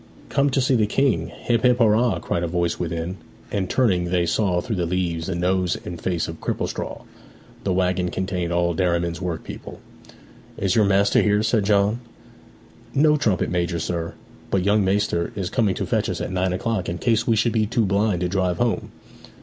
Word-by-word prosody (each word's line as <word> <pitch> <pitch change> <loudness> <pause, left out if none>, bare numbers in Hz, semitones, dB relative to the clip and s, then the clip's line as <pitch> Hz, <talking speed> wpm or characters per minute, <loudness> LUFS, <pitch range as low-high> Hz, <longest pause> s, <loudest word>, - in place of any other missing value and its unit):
'Come 140 0 +2
to 135 0 +1
see 130 +1 +2
the 110 -4 +3
King, 135 +5 +1
hip 115 -2 -1
hip 125 0 +4
hurrah!' 115 -1 +3
cried 85 - -2
a 85 - -1
voice 85 0 -1
within, 85 +2 -3 0.3
and 95 -3 -1
turning 95 -9 +2
they 85 0 +1
saw 90 0 +1
through 110 +3 -3
the 85 -1 0
leaves 85 -2 -1
the 95 - -2
nose 90 0 +1
and 85 -1 -6
face 90 -3 -1
of 80 -1 -8
Cripplestraw. - - -3 0.6
The 95 - +1
waggon 90 -1 +1
contained 90 -2 -2
all 85 0 +1
Derriman's 85 0 0
workpeople. 85 -3 -6 0.8
'Is 95 -2 0
your 110 - +4
master 100 +1 +3
here?' 105 0 +2
said 110 -2 +1
John. 105 +2 +2 1.0
'No, 150 +2 +5
trumpet 110 - 0
major, 85 -1 0
sir. 85 0 -3 0.3
But 95 -2 +1
young 105 0 +3
maister 95 -3 0
is 95 -3 -3
coming 105 -6 +1
to - - -2
fetch - - 0
us - - -3
at - - -4
nine 95 0 0
o'clock, 95 0 -2
in 85 - -3
case 115 +1 +1
we 115 - +4
should 115 +1 +1
be 110 -2 +1
too 115 0 +1
blind 100 -1 +1
to 90 - +1
drive 90 -1 0
home.' 120 -2 0
95 Hz, 190 wpm, -23 LUFS, 90-110 Hz, 1.0 s, No